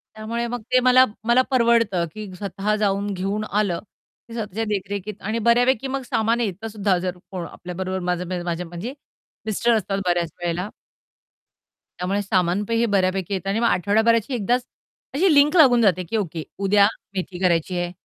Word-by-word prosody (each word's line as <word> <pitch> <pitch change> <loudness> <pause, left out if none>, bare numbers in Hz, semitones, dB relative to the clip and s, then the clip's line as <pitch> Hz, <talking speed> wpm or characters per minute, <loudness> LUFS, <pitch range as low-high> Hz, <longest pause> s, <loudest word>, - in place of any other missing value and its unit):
त्यामुळे 230 +2 -3
मग 245 0 -4
ते 255 - +6
मला 255 +1 +6 0.2
मला 240 +2 +5
परवडतं 230 -7 +3
की 210 -3 -7
स्वतः 200 +2 -2
जाऊन, 205 -1 0
घेऊन 195 +3 -2
आलं. 200 -4 0 0.5
ते - - -9
स्वतःच्या 220 -1 -3
देखरेखीत 205 0 -4
आणि 225 +2 -1
बऱ्यापैकी 245 +2 +3
मग 270 0 -2
सामान 225 +2 +1
येतसुद्धा 205 -2 -1
जर 180 0 -3
कोण 180 -3 -4
आपल्याबरोबर 185 +1 -5
माझ्या 180 -1 -2
म्हणजे 175 +10 -6 0.5
मिस्टर 220 +2 +1
असतात 200 -2 -1
बऱ्याच 175 -2 0
वेळेला 175 +3 -2 1.3
त्यामुळे 195 +3 -1
सामान 185 -1 +1
हे 230 0 +2
बऱ्यापैकी 190 -2 0
येत 190 -1 -3
आणि 200 +3 0
मग 235 - +3
आठवड्याभराची 220 +6 +2
एकदाच 245 +3 0 0.5
अशी 350 +1 +4
लिंक 290 +4 +5
लागून 250 -7 +6
जाते 185 -4 +3
की 225 - 0
ओके 165 -6 -3 0.2
उद्या 200 +1 +4 0.3
मेथी 180 -1 -4
करायची 175 0 +1
आहे. 175 0 -2
205 Hz, 155 wpm, -23 LUFS, 185-230 Hz, 1.3 s, ते